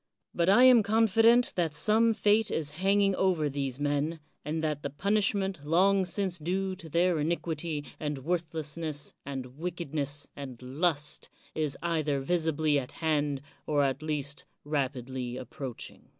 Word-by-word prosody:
But 170 +1 +2
I 210 +6 +7
am 255 -3 +8
confident 225 +3 +4
that 165 -4 0
some 220 +7 +3
fate 210 +1 +3
is 150 -2 -1
hanging 195 0 +3
over 180 -6 +2
these 135 -2 -3
men, 145 +3 0 0.2
and 155 +2 -3
that 150 -2 -1
the 140 - -3
punishment 195 +1 0
long 190 +5 +3
since 180 -1 -1
due 185 +4 -1
to 165 -3 -11
their 170 +1 +2
iniquity, 160 -1 -2
and 150 -2 -2
worthlessness, 160 -3 -3
and 130 -1 -6
wickedness, 150 -4 -3
and 130 -4 -8
lust, 150 +3 -1 0.2
is 150 -3 -2
either 155 -4 0
visibly 155 -1 +1
at 125 - -8
hand 145 -4 0 0.3
or 145 -2 +2
at 135 +1 0
least 150 -2 -3 0.2
rapidly 130 -3 -2
approaching. 130 0 -7
155 Hz, 140 wpm, -29 LUFS, 145-185 Hz, 0.3 s, am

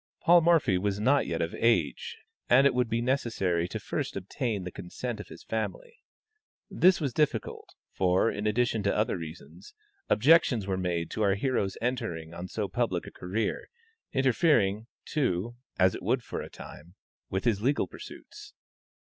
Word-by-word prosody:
Paul 175 0 +6
Morphy 160 - +3
was 100 +1 -1
not 135 +6 +3
yet 85 0 -1
of 85 - -4
age, 90 - 0 0.3
and 130 +3 +6
it 140 - +4
would 125 -2 +1
be 115 +1 0
necessary 105 -10 0
to - - -5
first - - -4
obtain 100 +1 -3
the 90 - -6
consent 110 +7 -6
of 105 - -8
his - - -12
family. 470 - -4 0.7
This 185 +1 +4
was 140 -6 -2
difficult, 135 -8 -1 0.2
for, 95 +4 +2
in 105 +1 -3
addition 115 0 +1
to 100 +1 0
other 105 +1 +1
reasons, 85 - -10 0.3
objections 130 - +4
were 95 -1 -1
made 90 -3 -2
to 110 - -3
our 100 -2 +3
hero's 100 -4 -1
entering 85 -10 -3
on 85 +2 -6
so 105 +2 -3
public 95 -3 -1
a - - -9
career, 100 +4 -3 0.4
interfering, 120 - +2 0.2
too, 120 - -1 0.2
as 95 0 +4
it - - -6
would 120 +5 0
for - - -5
a - - -8
time, 85 +5 -12 0.3
with 95 0 -2
his 105 -4 +2
legal 140 +5 +1
pursuits. - - -12
110 Hz, 165 wpm, -28 LUFS, 95-125 Hz, 0.7 s, Paul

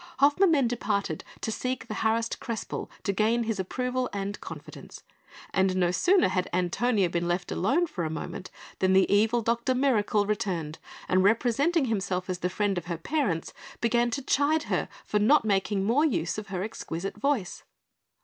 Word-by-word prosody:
Hoffmann 295 +8 +4
then 275 -6 +3
departed 205 -8 -2 0.2
to 220 - -2
seek 250 +1 -3
the 215 - -6
harassed 225 +1 0
Crespel 230 -2 -5
to 200 - 0
gain 225 +4 +2
his 220 -3 -2
approval 250 +6 -2
and 200 0 -4
confidence; - - -10 0.5
and 190 -1 +2
no 180 -2 +2
sooner 355 - +4
had 185 -1 -1
Antonia 195 +4 +1
been 170 0 -2
left 175 +1 -1
alone 270 - +2
for 190 - -4
a 160 - -1
moment 160 +3 -6 0.3
than 190 0 +3
the 190 0 +5
evil 220 +3 +3
Dr 235 +3 +1
Mirakel 220 -6 +2
returned, 180 -7 -2 0.3
and 185 0 +3
representing 255 - +2
himself 190 -5 -1
as 180 - -4
the 180 - -1
friend 195 0 0
of 170 - -14
her 170 -1 -3
parents, 190 - -1 0.3
began 235 +1 +2
to 275 +3 -3
chide 295 +4 +2
her - - 0 0.2
for 210 - 0
not 225 +6 +4
making 195 -1 +1
more 235 +9 +3
use 180 - 0
of 215 - -9
her 190 -1 -3
exquisite 195 -3 -5
voice. 235 -6 -1
210 Hz, 175 wpm, -27 LUFS, 185-245 Hz, 0.5 s, the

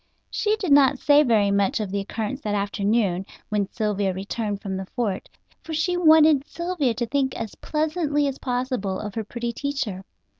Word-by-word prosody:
She 425 0 +1
did 385 -8 -3
not 280 -1 +6
say 290 +2 +5
very 220 -7 +3
much 200 +1 +1
of 210 -3 -3
the 200 - -1
occurrence 225 +6 -4
that 210 -1 -2
afternoon, 200 -1 0 0.3
when 205 -2 0
Sylvia 205 -3 0
returned 205 +1 -3
from 195 -1 -4
the 190 0 -5
fort, 205 -5 -3 0.3
for 320 - -5
she 355 +3 +1
wanted 315 -4 +5
Sylvia 340 -9 -1
to 240 - -1
think 265 +2 0
as 225 -2 -5
pleasantly 305 -1 -1
as 275 -1 -4
possible 245 -7 -2
of 210 -2 -5
her 225 - -3
pretty 235 +2 -4
teacher. 260 -10 -3
235 Hz, 180 wpm, -24 LUFS, 200-290 Hz, 0.3 s, not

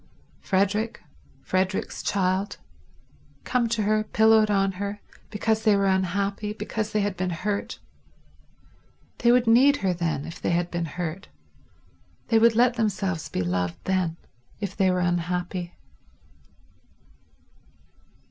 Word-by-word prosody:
Frederick, 205 +4 0 0.4
Frederick's 185 +1 -1
child—come 185 - -3
to 225 -2 0
her, 215 +1 +2
pillowed 220 0 +4
on 195 -1 +2
her, 200 +1 -3 0.3
because 220 +1 0
they 215 -2 +5
were 200 0 +1
unhappy, 195 +2 0
because 215 0 -4
they 210 - +1
had 200 -1 -1
been 185 0 -2
hurt... 200 +4 -3 1.4
They 235 - +4
would 250 0 +4
need 260 +5 +5
her 185 - +2
then, 165 -5 -2
if 165 - -9
they - - -1
had 175 0 0
been 170 -1 -2
hurt; 175 +3 -5 1.0
they 225 - +5
would 230 0 +5
let 245 +1 +4
themselves 195 -6 -1
be 90 - -2
loved 90 -1 -1
then, 185 -3 0 0.4
if 200 -3 -4
they 190 -1 +3
were 180 0 +1
unhappy. 175 0 -2
195 Hz, 125 wpm, -25 LUFS, 175-215 Hz, 1.4 s, they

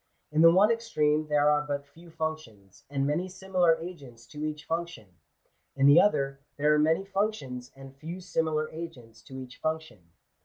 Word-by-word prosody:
In 155 +1 +2
the 165 - +9
one 200 +5 +5
extreme 155 -10 +1
there 150 0 +3
are 150 0 +3
but 145 -1 -4
few 165 +4 -17
functions, 155 - -6
and 135 -1 -1
many 165 +6 -1
similar 180 -3 +2
agents 140 -9 -10
to 150 0 -7
each 155 0 -4
function: 170 - -4 0.7
in 135 0 +2
the 145 +4 +8
other, 135 -9 +1 0.2
there 150 +1 +3
are 150 - +3
many 160 +5 +2
functions, 195 - -3
and 135 0 -12
few 165 +6 -7
similar 160 -4 -1
agents 130 -9 -9
to 130 - -11
each 130 -1 -9
function. 155 - -4
155 Hz, 170 wpm, -28 LUFS, 135-170 Hz, 0.7 s, the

